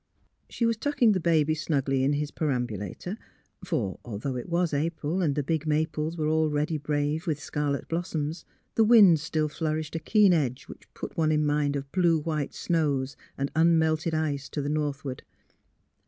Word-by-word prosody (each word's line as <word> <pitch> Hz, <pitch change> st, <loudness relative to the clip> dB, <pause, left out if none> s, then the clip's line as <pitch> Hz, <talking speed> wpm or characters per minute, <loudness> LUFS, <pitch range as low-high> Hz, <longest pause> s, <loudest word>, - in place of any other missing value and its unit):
She 235 Hz, -, -1 dB
was 230 Hz, -1 st, +1 dB
tucking 265 Hz, -2 st, +2 dB
the 190 Hz, -, +1 dB
baby 160 Hz, -3 st, +2 dB
snugly 140 Hz, -4 st, 0 dB
into 145 Hz, +2 st, +2 dB
his 150 Hz, 0 st, -3 dB
per 155 Hz, -, -2 dB
ambulator 120 Hz, -, -3 dB, 0.2 s
— -, -, -32 dB
for, 95 Hz, -, -2 dB
though 120 Hz, +4 st, -4 dB
it 125 Hz, -, -5 dB
was 170 Hz, -1 st, +1 dB
April 160 Hz, +3 st, -1 dB
and 150 Hz, -6 st, +1 dB
the 145 Hz, -, 0 dB
big 160 Hz, +2 st, -1 dB
maples 155 Hz, +1 st, -1 dB
were 155 Hz, -1 st, 0 dB
already 155 Hz, 0 st, +1 dB
brave 150 Hz, +3 st, -1 dB
with 150 Hz, -3 st, 0 dB
scarlet 145 Hz, -1 st, -2 dB
blossoms, 165 Hz, -2 st, -3 dB, 0.3 s
the 225 Hz, -, +4 dB
wind 210 Hz, -8 st, +7 dB
still 155 Hz, 0 st, -1 dB
flourished 155 Hz, 0 st, -3 dB
a -, -, -1 dB
keen 200 Hz, +3 st, +4 dB
edge 135 Hz, -5 st, 0 dB
which -, -, -14 dB
put -, -, -7 dB
one 155 Hz, -1 st, +2 dB
in 150 Hz, 0 st, +2 dB
mind 145 Hz, -1 st, +1 dB
of 140 Hz, 0 st, -5 dB
blue 175 Hz, -3 st, +3 dB
white 150 Hz, -2 st, -3 dB
snows 145 Hz, -5 st, 0 dB, 0.2 s
and 140 Hz, +1 st, -2 dB
unmelted 160 Hz, 0 st, +3 dB
ice 145 Hz, -3 st, -2 dB
to -, -, -4 dB
the 140 Hz, -, -2 dB
northward. 145 Hz, -3 st, -2 dB
155 Hz, 180 wpm, -27 LUFS, 145-165 Hz, 0.3 s, wind